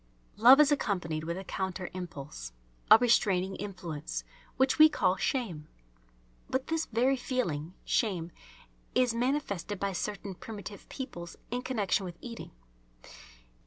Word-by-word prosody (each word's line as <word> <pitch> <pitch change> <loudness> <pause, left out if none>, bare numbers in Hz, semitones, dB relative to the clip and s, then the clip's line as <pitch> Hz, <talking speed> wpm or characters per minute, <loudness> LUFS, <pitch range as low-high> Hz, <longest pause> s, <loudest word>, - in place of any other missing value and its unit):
Love 250 +6 +8
is 300 -1 +6
accompanied 170 - -1
with 170 +2 -3
a 190 - -5
counter 190 -1 -3
impulse, 145 - -7 0.4
a - - +11
restraining 195 -5 +2
influence, 175 -7 -5 0.3
which 265 +3 +2
we 310 0 +10
call 190 -11 +2
shame. 190 - -2 0.8
But 260 0 0
this 325 0 -1
very 250 +4 +2
feeling, 185 - -2
shame, 175 -7 0 0.6
is 250 -2 +3
manifested 230 - -1
by 200 +1 0
certain 195 +1 -4
primitive 205 +1 -9
peoples 175 -11 -7 0.2
in 245 +1 -1
connection 215 -6 0
with 175 -2 -7
eating. 235 -2 -8
200 Hz, 125 wpm, -30 LUFS, 175-250 Hz, 0.8 s, a